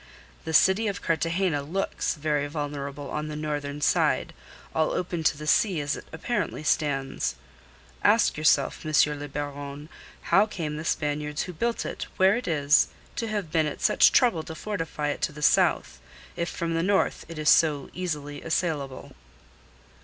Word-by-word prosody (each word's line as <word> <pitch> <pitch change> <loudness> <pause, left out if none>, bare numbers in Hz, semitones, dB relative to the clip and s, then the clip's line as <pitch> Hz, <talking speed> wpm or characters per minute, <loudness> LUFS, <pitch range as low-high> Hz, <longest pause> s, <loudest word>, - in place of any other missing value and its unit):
This 160 -1 +5
city 195 +4 +3
of 200 -3 -3
Cartagena 165 -1 0
looks 175 +8 -2
very 150 -1 -1
vulnerable 145 -1 -5
on 150 0 -3
the 155 - -5
northern 150 -1 -4
side, - - +2 0.4
all 160 0 +1
open 175 -2 -2
to 145 - +3
the 150 - -7
sea 185 +2 +3
as 145 0 -1
it - - -10
apparently 165 0 -3
stands. 135 - 0 0.7
Ask - - +4
yourself, 155 +1 +2
M. 155 -1 -4 0.3
le 145 - -5
Baron, 145 +1 -6 0.4
how 205 +2 +6
came 155 -7 -4
the 155 - -6
Spaniards 150 -1 -1
who 180 - -7
built 235 +8 -1
it - - -5
where 190 +1 +5
it 245 0 -4
is 150 -2 +4 0.3
to 230 - -2
have 205 -7 -3
been 160 -2 +2
at 150 - -5
such - - +5
trouble 235 -11 +3
to 160 - -8
fortify 165 -6 -3
it 145 - -3
to - - 0
the 150 0 -8
south, - - +3 0.4
if 170 - -2
from 170 -1 -3
the 165 - +1
north 195 +2 +1
it 165 - -8
is 155 0 +2
so 150 -4 +3
easily 150 -5 -4
assailable." 155 -5 -2
155 Hz, 170 wpm, -26 LUFS, 145-175 Hz, 0.7 s, how